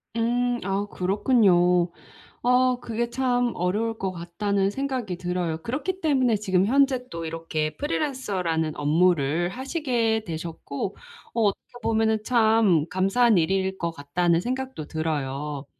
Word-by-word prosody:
음 230 +1 +1 0.3
아 200 +1 -1
그렇군요. 180 -3 +3 0.6
어 250 0 +3
그게 235 0 -3
참 245 -1 +1
'어려울 215 +6 -1
것 190 -1 -2
같다.'는 195 +3 -1
생각이 255 -6 -3
들어요. 175 -2 -2
그렇기 345 +10 -3
때문에 260 - +2
지금 190 -3 +1
현재 260 0 +2
또 165 0 -5
이렇게 160 -1 -3
프리랜서라는 195 - -1
업무를 160 +1 +2
하시게 245 - -1
되셨고 165 +1 -5 0.4
어 235 - 0
어떻게 205 -2 -1
보면은 220 -1 +1
참 220 - +3
'감사한 200 +4 +3
일일 190 +3 0
것 170 0 -1
같다.'는 165 +3 0
생각도 260 - -4
들어요. 145 -2 -3
195 Hz, 285 characters per minute, -25 LUFS, 170-245 Hz, 0.6 s, 그렇군요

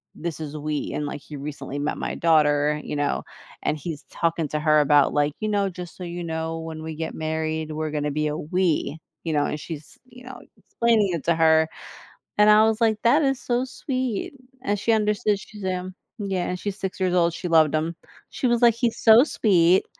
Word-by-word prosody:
"This 170 -1 -5
is 155 -1 -6
we," 150 0 -3
and 150 - -2
like 145 - -6
he 150 - -9
recently 140 -1 -6
met 145 +1 -2
my - - -3
daughter, 150 -2 +3
you - - -5
know, 145 - 0 0.4
and 150 - 0
he's 155 0 -6
talking 165 -2 0
to 150 - -2
her 155 0 +4
about 145 -1 +4
like, 145 0 +1
"You 215 - -2
know, 200 -2 +1
just 180 -1 -9
so 185 - -7
you 175 0 -5
know, 160 0 -3
when 160 -1 -7
we 160 0 -5
get 160 +1 -5
married 160 0 -2
we're 155 0 -3
going 150 -1 -2
to 150 - -1
be 150 +1 0
a 150 0 -2
we," 165 -1 0 0.2
you 165 - -2
know, 145 -1 +2
and 150 - -3
she's 155 -1 -9
you 250 0 -15
know, 265 - -9 0.2
explaining 230 -4 +1
it 165 - -3
to 170 - +3
her, 160 -1 +4 0.7
and 210 0 +7
I 210 +1 +7
was 220 +1 0
like, 220 -2 +3
"That 245 +7 +5
is 270 -2 +1
so 245 +1 0
sweet," 255 -3 -3 0.3
and 205 -6 0
she 230 - +1
understood, 210 -1 +1
she's, 205 +1 -11
um 185 0 -3 0.3
Yeah, 195 -3 -2
and 180 - -3
she's 200 0 -4
6 190 0 -4
years 185 -1 +1
old, 170 -2 +3
she 175 +2 -5
loved 155 -2 +4
him, 160 +2 -1 0.4
she 255 - -1
was 240 0 +2
like, 235 -1 +7
"He's 235 -1 0
so 225 +2 +7
sweet," 185 - +3
170 Hz, 220 wpm, -24 LUFS, 155-210 Hz, 0.7 s, and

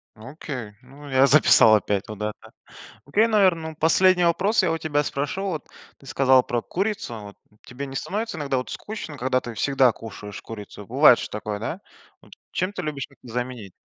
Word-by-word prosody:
Окей. 125 -1 -7
Ну 140 +3 -13
я 130 +1 +4
записал 125 -5 +6
опять 100 -1 -1
вот 105 -2 -8
это. 105 0 -2 0.7
Окей, 205 +11 +3
наверно, 190 -7 +2
ну, 155 - -13
последний 180 +3 +4
вопрос 190 +5 +2
я 165 -3 +1
у 165 - -2
тебя 150 -2 0
спрошу. 145 +8 -3
Вот 180 -7 -4 0.3
ты 135 - -18
сказала 130 -1 +4
про 120 -1 -2
курицу 200 - -3
вот. 100 -1 -11 0.3
Тебе 135 +2 -6
не 135 0 -8
становится 220 - -3
иногда 140 -3 -1
вот 125 - -3
скучно, 210 -9 -7
когда 130 0 +1
ты 120 - -7
всегда 135 +1 +3
кушаешь 105 -2 -9
курицу? 105 -2 -10
Бывает 130 -1 +6
же - - -5
такое, 105 0 -5
да? 155 - -5 0.4
Вот - - -21 0.2
чем 185 +2 -1
ты - - -5
любишь 145 -3 -4
это 120 -3 -14
заменить? 120 -5 -4
135 Hz, 185 wpm, -24 LUFS, 120-165 Hz, 0.7 s, записал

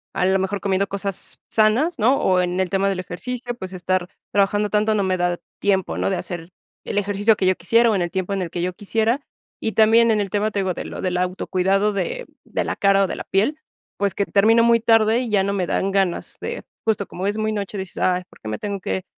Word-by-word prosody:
a 180 - +1
lo 190 +1 +3
mejor 190 +1 -2
comiendo 195 0 +1
cosas 200 -1 -4
sanas, 235 +8 +2
¿no? 250 +6 +3
O, 185 -1 +3
en 180 +1 0
el 185 - -1
tema 195 +1 +1
del 190 -2 -1
ejercicio, 245 +7 -5
pues, 190 -4 -7
estar 185 0 -1 0.2
trabajando 205 +1 +2
tanto 215 +1 +2
no 200 - +1
me 185 -1 0
da 175 0 0 0.2
tiempo, 190 -2 0
¿no? - - 0
De 190 - 0
hacer 175 -1 -5 0.4
el - - -3
ejercicio 205 +2 +2
que 190 - -1
yo 185 0 +3
quisiera, 230 +6 +3
o, 210 - +1
en 185 - 0
el 175 - -1
tiempo 190 +1 -3
en 195 - -1
el 175 - -3
que 175 - -4
yo 180 +1 0
quisiera. 225 +5 0 0.4
Y 220 - -1
también 225 +1 +5
en 215 -2 +3
el 195 - -3
tema, 210 +2 0
te 205 - -2
digo, 190 -2 0
de - - -6
lo - - -6
del 180 -1 -1
auto 180 +1 -2
cuidado 195 +3 +2
de - - -3 0.2
de - - -2
la - - -3
cara, 195 0 +4
o, - - +1
de - - -5
la - - -6
piel, 225 +11 +1 0.4
pues, 200 -1 0
que 200 - 0
termino 225 +4 +4
muy 235 0 +5
tarde, 225 0 +4
y 250 -2 -3
ya 200 -2 +3
no 200 - 0
me 185 -3 -1
dan 195 - 0
ganas 195 -3 -1
de, - - -5 0.2
justo 215 -3 +1
como 185 +2 -4
es 205 +1 -1
muy 215 0 0
noche, 205 -1 -4
dices: 190 -1 -6
"Ay, 180 0 +1
por - - -20
qué - - -10
me 110 0 -3
tengo 200 -1 -4
que 185 0 -3
200 Hz, 255 wpm, -22 LUFS, 185-215 Hz, 0.4 s, también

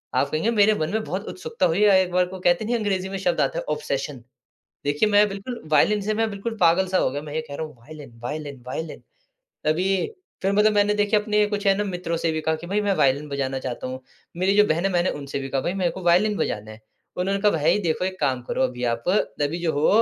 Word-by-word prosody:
आप 140 - +2
कहेंगे 160 +10 0
मेरे 215 -1 +4
मन 155 0 -1
में 220 0 0
बहुत 195 +2 -4
उत्सुकता 465 +4 -2
हुई 175 +5 +2
अ, 205 - +6
एक 185 -1 +3
बार 180 0 +3
को 185 +1 -8
कहते 175 +3 +2
नहीं 240 +3 0
अंग्रेजी 190 -4 -1
में 195 - -4
शब्द 225 +7 0
आता - - 0
है - - -6
ऑब्सेशन। 145 - -4 0.6
देखिए 145 +9 +2
मैं 205 0 +5
बिल्कुल 200 +5 -6
वायलिन 210 +7 +4
से 215 +2 -1
मैं 225 +1 0
बिल्कुल 215 +3 -5
पागल 175 +2 +4
सा 185 - +1
हो - - +2
गया, 145 +2 -4
मैं 150 -1 -8
ये 160 - -1
कह 140 - -5
रहा 160 - -3
हूँ 155 - -12
वायलिन 145 0 -12
वायलिन 145 -1 -5
वायलिन। 155 +5 -5 0.6
तभी 160 +5 +1 0.5
फिर 195 0 +1
मतलब 210 +1 +4
मैंने 205 0 +3
देखे 205 0 +2
अपने 210 0 +2
कुछ 205 -1 -3
है 195 - +6
ना 210 - 0
मित्रों 180 -4 -3
से 165 0 0
भी 155 - -2
कहा 160 +1 0
कि 165 +2 -9
भाई 205 +3 0
मैं 205 -1 +1
वायलिन 140 +1 +2
बजाना 135 -1 -2
चाहता 130 -1 -5
हूँ, 130 0 -6 0.4
मेरी 185 +2 +2
जो 210 - +7
बहन 165 +4 +1
है 195 - +1
मैंने 175 0 +2
उनसे 140 -1 -4
भी 135 0 -5
कहा 135 0 0
भाई 175 - -2
मेरे 185 -3 0
को 190 - -8
वायलिन 185 +5 +3
बजाना 105 +1 -2
है, 110 - -12 0.4
उन्होंने 195 +2 0
कहा 210 0 +4
भाई 160 +4 +2
देखो 170 +1 0
एक 185 0 -4
काम 130 -4 0
करो - - +1
अभी 125 -1 -2
आप, 115 -1 -1 0.4
अभी 145 +4 0
जो 170 -2 +1
हो, 145 +2 +2
180 Hz, 255 wpm, -24 LUFS, 150-205 Hz, 0.6 s, जो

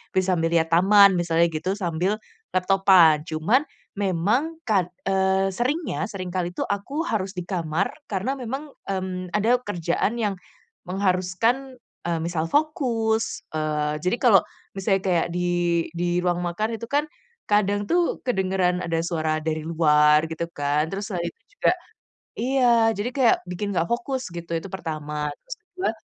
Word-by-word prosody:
bisa 185 -1 +3
sambil 165 -1 +1
lihat 165 -1 +3
taman 200 +3 +7
misalnya 170 -1 +2
gitu, 165 +3 -3
sambil 180 +3 -1 0.3
laptopan. 185 -4 +5
Cuman 165 - +1 0.3
memang 205 - 0
kad 190 -5 +2 0.2
eee, 190 0 +2
seringnya, 260 - -1
sering 185 -2 -5
kali 175 -1 -1
itu 180 - -11
aku 275 +12 -2
harus 195 -4 -1
di 180 -3 -6
kamar 175 -1 -1 0.2
karena 210 +8 -1
memang, 270 +4 -5 0.2
mmm, 185 -1 -4
ada 215 +5 +3
kerjaan 195 +4 -1
yang 205 -3 0 0.5
mengharuskan, 195 +8 0 0.3
eee, 170 -1 0
misal 170 -1 -1
fokus. 235 - 0
Eee, 150 -1 -1
jadi 180 +7 +1
kalau 215 -7 +7 0.3
misalnya 195 0 +1
kayak 175 -3 +2
di 180 0 0 0.5
di 175 +1 0
ruang 175 -1 +1
makan 215 +6 -2
itu 230 - -7
kan 290 +1 +2 0.4
kadang 205 0 +2
tuh 345 -1 +1
kedengeran 190 -6 +1
ada 165 -1 0
suara 160 -2 -1
dari 160 0 -1
luar 150 -2 +4
gitu 160 +1 -2
kan. 145 +1 0
Terus 200 +3 -5
selain 175 -2 -2
itu - - -24 0.2
juga - - +4 0.7
iya, 260 +2 +1 0.3
jadi 205 +5 -2
kayak 260 -4 +4
bikin 200 +3 -3
nggak 165 - +2
fokus 255 +2 -2
gitu. 170 -1 -7
Itu 165 - -8
pertama. 150 -4 -4 0.2
Terus - - -8
kedua, 375 -3 -3
190 Hz, 150 wpm, -24 LUFS, 170-220 Hz, 0.7 s, taman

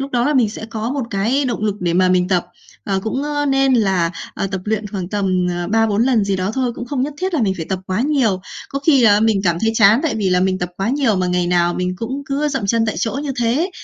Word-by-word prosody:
lúc 275 +1 -4
đó 245 -2 +1
là 295 - +1
mình 245 -5 +3
sẽ 220 - -7
có 225 0 -4
một 280 -1 -2
cái 225 +8 0
động 235 -4 -2
lực 210 -2 0
để 175 -2 0
mà 185 +1 +3
mình 180 0 +2
tập, 180 -3 +1 0.4
ờ, 195 -1 -1
cũng, 240 +6 -2
ơ, 290 0 -1
nên 270 -1 +3
là, 190 -7 +2 0.2
ờ, - - -2
tập 190 -1 -4
luyện 215 0 -1
khoảng 195 -3 -5
tầm, 185 -3 0
ờ, 175 0 -3
3-4 225 0 +2
lần 240 -4 +2
gì 200 -1 0
đó 185 +1 -1
thôi, 255 -2 0
cũng 240 - -7
không 255 0 -2
nhất 285 +2 -3
thiết 370 +3 -2
là 290 - +1
mình 195 -3 +1
phải 160 - -5
tập 190 - -1
quá 185 +3 -1
nhiều. 255 -9 +1 0.3
Có 275 - -3
khi 280 -5 +5
là 210 -2 +5
mình 220 -2 +2
cảm 170 -2 +2
thấy 225 - +2
chán 220 +2 +5
tại 320 -5 0
vì 200 -4 0
là 180 0 +3
mình 185 0 +1
tập 180 -1 -2
quá 195 +3 -1
nhiều 265 -6 +1
mà 185 0 0
ngày 180 0 0
nào 175 0 +2
mình 180 0 -2
cũng 255 +7 -4
cứ 290 +1 -1
dậm 270 -8 -2
chân 230 +2 +1
tại 215 - -1
chỗ 225 - -1
như 285 -2 -3
thế, 260 +11 +1
220 Hz, 285 wpm, -19 LUFS, 185-265 Hz, 0.4 s, khi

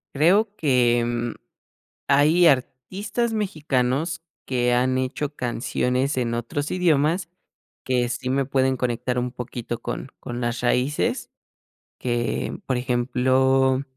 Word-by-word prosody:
Creo 195 +9 +4
que, 120 -5 +3
mm, 120 0 -2 0.7
hay 150 +5 +5
artistas 185 - 0
mexicanos 155 - -1 0.2
que 125 -1 +1
han 130 +1 +2
hecho 140 +3 -2
canciones 125 +2 -1
en 120 -2 0
otros 120 +5 -3
idiomas 170 0 +2 0.6
que 125 -2 +1
sí 125 +1 -3
me 135 +1 +2
pueden 130 0 +1
conectar 125 0 -1
un 125 0 -1
poquito 120 -1 -6
con, 120 +3 -5
con 120 0 -6
las 120 0 -1
raíces 125 +4 0 0.7
que 120 -1 -2
por 130 - 0
ejemplo, 130 +2 +2
130 Hz, 115 wpm, -24 LUFS, 120-145 Hz, 0.7 s, hay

